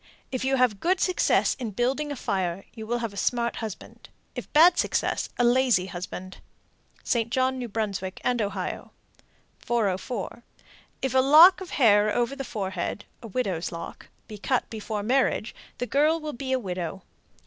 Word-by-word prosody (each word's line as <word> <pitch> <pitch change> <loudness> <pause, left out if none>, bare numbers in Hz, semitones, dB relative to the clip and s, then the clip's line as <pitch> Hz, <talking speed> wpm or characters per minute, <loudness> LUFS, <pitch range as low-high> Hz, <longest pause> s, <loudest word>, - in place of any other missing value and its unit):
If 255 -1 -2
you 265 +1 +2
have 250 -6 +2
good 365 +2 +1
success 365 -1 +2
in 240 -3 -3
building 270 +5 0
a - - -3
fire, 190 -6 -2
you 220 -2 -8
will 240 +1 0
have 230 -3 -4
a - - -11
smart 235 +3 0
husband; 220 -4 -8 0.2
if - - -7
bad 340 +3 +6
success, - - 0
a 245 - +2
lazy 240 -5 +3
husband. 185 +1 -7 0.7
St. 230 -3 0
John, 260 +1 0
N.B., 205 -5 -3
and 245 -2 +1
Ohio. 195 -3 -4 0.7
404. 225 +1 -2 0.6
If 265 -2 0
a 260 - +5
lock 315 +8 +8
of 370 - -7
hair 210 -5 +4
over 240 +3 0
the 275 - -5
forehead 195 -5 -4 0.2
("widow's 195 -7 -2
lock") 170 -1 -8 0.2
be 210 -1 -9
cut 255 +5 0
before 215 -1 -4
marriage, 250 -1 +1 0.2
the 245 - -2
girl 300 +5 +2
will 305 -1 -5
be 260 +2 -5
a 260 - +3
widow. 185 -4 -5
235 Hz, 160 wpm, -26 LUFS, 200-260 Hz, 0.7 s, lock